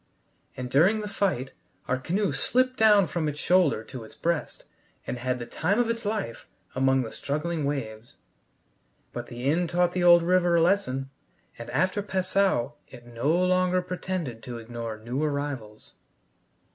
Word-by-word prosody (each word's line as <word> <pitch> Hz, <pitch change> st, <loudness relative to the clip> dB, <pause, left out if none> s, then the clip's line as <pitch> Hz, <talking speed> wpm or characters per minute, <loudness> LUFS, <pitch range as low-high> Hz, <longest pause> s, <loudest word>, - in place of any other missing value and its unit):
And 125 Hz, -1 st, -5 dB
during 190 Hz, -, +4 dB
the 210 Hz, -, -4 dB
fight 190 Hz, -10 st, -1 dB, 0.3 s
our 130 Hz, 0 st, 0 dB
canoe 190 Hz, +9 st, 0 dB
slipped 255 Hz, +1 st, +1 dB
down 210 Hz, -4 st, +6 dB
from 155 Hz, 0 st, -2 dB
its 150 Hz, 0 st, -4 dB
shoulder 175 Hz, -11 st, +3 dB
to 120 Hz, +1 st, -9 dB
its 110 Hz, -, -14 dB
breast, 170 Hz, -2 st, -2 dB, 0.4 s
and 125 Hz, -, -4 dB
had 125 Hz, +1 st, -1 dB
the 120 Hz, -, -6 dB
time 185 Hz, -, 0 dB
of 240 Hz, -1 st, +2 dB
its 230 Hz, -1 st, -5 dB
life 205 Hz, -, -3 dB, 0.3 s
among 135 Hz, 0 st, +2 dB
the 110 Hz, -, -7 dB
struggling 155 Hz, +4 st, -2 dB
waves. 120 Hz, -5 st, -4 dB, 1.0 s
But -, -, -5 dB
the 120 Hz, +1 st, -8 dB
Inn 165 Hz, +5 st, +2 dB
taught 175 Hz, +1 st, +2 dB
the 180 Hz, 0 st, -1 dB
old 175 Hz, -1 st, +7 dB
river 175 Hz, 0 st, +3 dB
a 170 Hz, -, +4 dB
lesson, 135 Hz, -8 st, 0 dB, 0.5 s
and 115 Hz, 0 st, -7 dB
after 185 Hz, +9 st, +1 dB
Passau 190 Hz, -8 st, +1 dB, 0.2 s
it 120 Hz, -2 st, -13 dB
no 120 Hz, +4 st, -2 dB
longer 185 Hz, +1 st, +2 dB
pretended 180 Hz, -9 st, -4 dB
to 120 Hz, +1 st, -7 dB
ignore 115 Hz, -1 st, -6 dB
new 120 Hz, +6 st, -4 dB
arrivals. 140 Hz, -8 st, -4 dB
155 Hz, 160 wpm, -27 LUFS, 125-185 Hz, 1.0 s, old